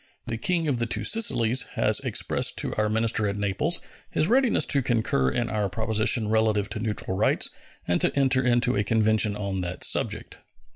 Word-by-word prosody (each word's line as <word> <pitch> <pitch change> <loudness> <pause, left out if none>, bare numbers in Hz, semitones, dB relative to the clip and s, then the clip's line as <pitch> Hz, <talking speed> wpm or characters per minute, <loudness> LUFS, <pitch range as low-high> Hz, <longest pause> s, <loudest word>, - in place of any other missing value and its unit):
The 115 -1 -4
King 170 +3 0
of 130 -5 0
the 115 - 0
Two - - -2
Sicilies 130 - +2
has - - +2
expressed - - 0
to - - -1
our 105 0 0
minister 110 0 +1
at 100 0 -3
Naples 105 - -1 0.3
his 155 - 0
readiness 245 - +2
to 140 - +1
concur 110 - 0
in 120 - -2
our 105 -3 -2
proposition 110 +2 0
relative 110 -2 +1
to 110 - -5
neutral 105 -3 -3
rights 105 +3 +1 0.4
and 90 - 0
to - - +1
enter 135 -1 +2
into 120 -1 +2
a 100 - +1
convention 110 0 +1
on 100 -2 -3
that 90 0 -3
subject. - - -1
110 Hz, 185 wpm, -25 LUFS, 105-125 Hz, 0.4 s, Sicilies